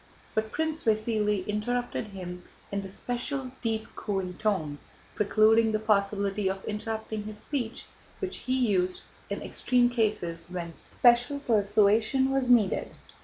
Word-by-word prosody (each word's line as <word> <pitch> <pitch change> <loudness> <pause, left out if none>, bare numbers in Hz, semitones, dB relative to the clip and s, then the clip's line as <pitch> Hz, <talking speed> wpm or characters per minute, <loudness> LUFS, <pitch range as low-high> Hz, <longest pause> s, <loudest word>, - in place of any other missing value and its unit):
But 220 0 -1
Prince 320 +1 -1
Vasíli 215 -3 +1
interrupted 235 +3 -2
him 180 -3 -7 0.3
in 200 0 -1
the 195 - -8
special 250 +5 -3
deep 225 -2 -1
cooing 190 -3 -2
tone, 160 -9 0 0.3
precluding 220 +2 +4
the 215 - +2
possibility 200 -1 +1
of 190 0 -4
interrupting 220 0 -4
his 215 0 -6
speech, 240 0 -3 0.3
which 385 -1 -4
he 255 +1 -1
used 185 -3 +1 0.3
in - - -3
extreme 245 -1 +2
cases 210 -8 -1
when 175 -2 -5
special 245 - +3
persuasion 215 +3 +3
was 270 -2 +2
needed. 225 -6 +3
215 Hz, 130 wpm, -28 LUFS, 200-240 Hz, 0.3 s, precluding